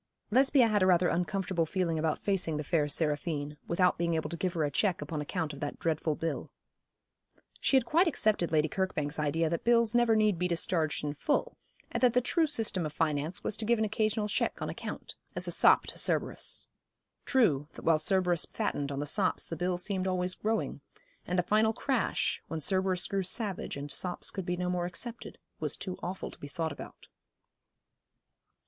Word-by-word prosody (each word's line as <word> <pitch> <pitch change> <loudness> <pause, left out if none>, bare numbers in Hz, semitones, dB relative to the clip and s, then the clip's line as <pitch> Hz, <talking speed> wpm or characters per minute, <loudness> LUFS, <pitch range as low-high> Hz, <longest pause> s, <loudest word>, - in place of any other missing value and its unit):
Lesbia 265 +1 +5
had 210 -2 +2
a 185 - +4
rather 180 -1 +4
uncomfortable 180 -1 -1
feeling 170 -3 -1
about 155 -1 0
facing 185 -6 0
the 150 - -3
fair 150 -1 +1
Seraphine, 150 -1 -1
without 180 +1 +2
being 170 -1 +1
able 160 -1 -2
to - - -2
give 180 +1 -2
her 165 -3 0
a 145 - 0
cheque 185 +4 +1
upon 150 +1 -4
account 155 0 -3
of 140 - -9
that 145 0 -4
dreadful 160 -1 -1
bill. 165 +2 -3 1.1
She 270 - +3
had 255 - +2
quite 335 +8 +3
accepted 215 - +1
Lady 155 -1 +3
Kirkbank's 155 -4 -2
idea 160 +2 +1
that 170 - -2
bills 235 -1 +4
never 240 -2 +4
need 215 -5 +2
be 180 - +1
discharged 165 -3 0
in 145 -1 -2
full, 295 - -1 0.4
and - - -2
that 250 -2 +5
the 250 - +5
true 320 +6 +2
system 225 - 0
of 155 - -3
finance 155 +1 -1
was 215 - -1
to - - +2
give 235 +2 +3
an 220 - +1
occasional 215 0 0
cheque 205 - -1
on - - -3
account, - - -7 0.2
as - - -2
a - - -2
sop - - +5
to - - -6
Cerberus. - - 0 0.6
True, 160 - +3
that - - -11
while 165 -2 +4
Cerberus 180 -2 +2
fattened 145 -1 -2
on 140 0 -3
the - - -2
sops 185 +5 +1
the 165 - -5
bill 180 +2 -1
seemed 190 +1 -2
always 180 0 0
growing; 220 +4 -2 0.5
and 180 - -1
the 180 - +3
final 215 +4 +3
crash, 255 -1 -1
when 160 - -4
Cerberus 185 +2 +2
grew 195 -1 -1
savage 195 - -1
and 145 +1 -4
sops 180 +4 -1
could 190 -3 -5
be 180 0 -1
no 180 0 -2
more 180 -1 -1
accepted, 235 +6 -5 0.2
was - - -1
too 185 -2 -6
awful 185 +2 -5
to - - -14
be 145 - -7
thought 160 +2 -3
about. 140 - -10
180 Hz, 200 wpm, -30 LUFS, 160-210 Hz, 1.1 s, Lesbia